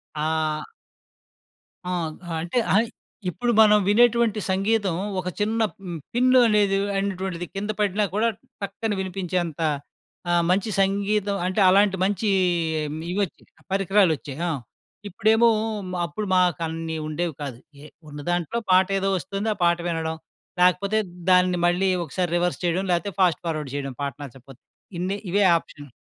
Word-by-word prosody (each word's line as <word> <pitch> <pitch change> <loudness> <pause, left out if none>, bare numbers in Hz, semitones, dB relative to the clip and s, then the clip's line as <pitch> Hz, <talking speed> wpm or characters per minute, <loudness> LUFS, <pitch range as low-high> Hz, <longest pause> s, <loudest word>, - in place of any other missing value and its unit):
ఆ! 155 0 -1 1.3
ఆ! - - -1 0.5
అంటే 175 +9 -1 0.2
అయి 225 +3 +3 0.4
ఇప్పుడు 240 +8 -1
మనం 210 -1 +7
వినేటువంటి 235 0 +4
సంగీతం 195 0 +1 0.3
ఒక 185 - -5
చిన్న 220 +2 0 0.2
హ్మ్. 175 -3 -5 0.2
పిన్‌లోనేది 235 -6 +4 0.2
అనేటువంటిది 190 -3 -3
కింద 205 +2 -3
పడినా 205 +1 +1
కూడా 220 +3 +2 0.3
టక్కన 215 +2 -3
వినిపించేంత 180 -4 -3 0.7
ఆ! - - +3 0.2
మంచి 195 +4 +1
సంగీతం 200 +1 +1
అంటే, 185 +3 0
అలాంటి 195 +1 +4
మంచి 205 +2 0 0.8
ఇవి 180 - -3
వచ్చాయి, 185 - -13 0.3
పరికరాలు 195 -2 +3
వచ్చాయి. 140 -1 -9
ఆ - - 0 0.6
ఇప్పుడేమో 220 +5 +3 0.6
అప్పుడు 170 +6 -4
మాకన్ని 165 -2 0
ఉండేవి 165 +2 -2
కాదు 135 -5 -5 0.2
ఏ - - -10 0.2
ఉన్న 145 0 -8
దాంట్లో 175 +5 -1
పాట 185 0 +6
ఏదో 195 0 0
వస్తుంది 195 +6 -3
ఆ - - -16
పాట 170 0 +3
వినడం. 160 -1 -2 0.4
లేకపోతే 195 +4 +3 0.3
దాన్ని 180 -1 +4
మళ్ళీ 180 +2 +2 0.2
ఒకసారి 175 +3 -2
రివర్స్ 175 0 0
చేయడం 175 +2 +1
లేకపోతే 180 +3 0
ఫాస్ట్ 180 -4 +3
ఫార్వర్డ్ 155 -4 -3
చేయడం 140 -1 -3
పాట 140 -2 -2
నచ్చకపోతే 135 -1 -12 0.4
ఇన్నే 185 +3 -1
ఇవే 200 +3 +2
ఆప్షన్. 145 -3 -8
185 Hz, 135 wpm, -24 LUFS, 165-205 Hz, 1.3 s, మనం